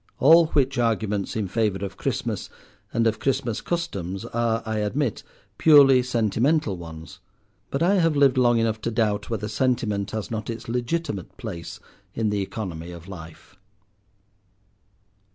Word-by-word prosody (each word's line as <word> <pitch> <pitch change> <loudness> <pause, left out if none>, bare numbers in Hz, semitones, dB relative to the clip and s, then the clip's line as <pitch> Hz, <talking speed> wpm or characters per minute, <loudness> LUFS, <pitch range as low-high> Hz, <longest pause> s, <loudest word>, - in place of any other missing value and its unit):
All 165 +3 +7
which 135 -4 +1
arguments 110 -4 0
in 105 -3 -1
favour 100 -1 0
of 95 -1 -7
Christmas - - -3 0.4
and 115 - +1
of 110 -1 +1
Christmas 135 -4 -1
customs 100 - -3
are, 115 0 -1
I 110 -1 -2
admit, 115 +3 -1 0.4
purely 140 -4 +7
sentimental 120 +1 +1
ones, 80 -2 -10 0.5
but 140 - -1
I 190 +3 +4
have 165 -3 +2
lived 140 -2 +4
long 120 -1 +4
enough 110 -1 0
to - - -1
doubt 110 -3 0
whether 110 -2 -2
sentiment 110 -3 0
has 110 0 -5
not 110 0 -4
its 115 -1 -6
legitimate 120 - -3
place 100 - -7 0.4
in 110 -2 0
the 100 -1 0
economy 90 -5 -5
of 85 -1 -10
life. 85 0 -11
115 Hz, 145 wpm, -24 LUFS, 100-130 Hz, 0.5 s, All